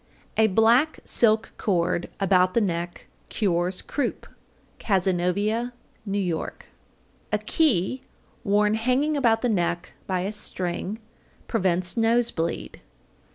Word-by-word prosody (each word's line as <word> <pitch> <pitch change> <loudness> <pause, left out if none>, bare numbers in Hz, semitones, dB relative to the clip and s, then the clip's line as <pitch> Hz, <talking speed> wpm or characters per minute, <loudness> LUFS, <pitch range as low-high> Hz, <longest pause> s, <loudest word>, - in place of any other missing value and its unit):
A 220 0 +4
black 230 +9 +3
silk 220 -1 +2
cord 175 -3 0
about 185 -1 +3
the - - +5
neck 175 -4 -3 0.2
cures 180 -3 0
croup. 285 - -3 0.5
Cazenovia, 200 +4 0 0.3
N.Y. 195 -2 0
804. 160 - -3 0.8
A - - +4
key 255 - +1 0.4
worn 210 -1 +3
hanging 255 +7 +1
about 230 -5 +2
the 245 - +2
neck 175 -3 -1
by 185 -2 0
a 195 +3 -2
string 185 0 -4 0.5
prevents 185 -4 +1
nose 230 +1 +2
bleed. 165 0 -4
205 Hz, 110 wpm, -25 LUFS, 180-230 Hz, 0.8 s, the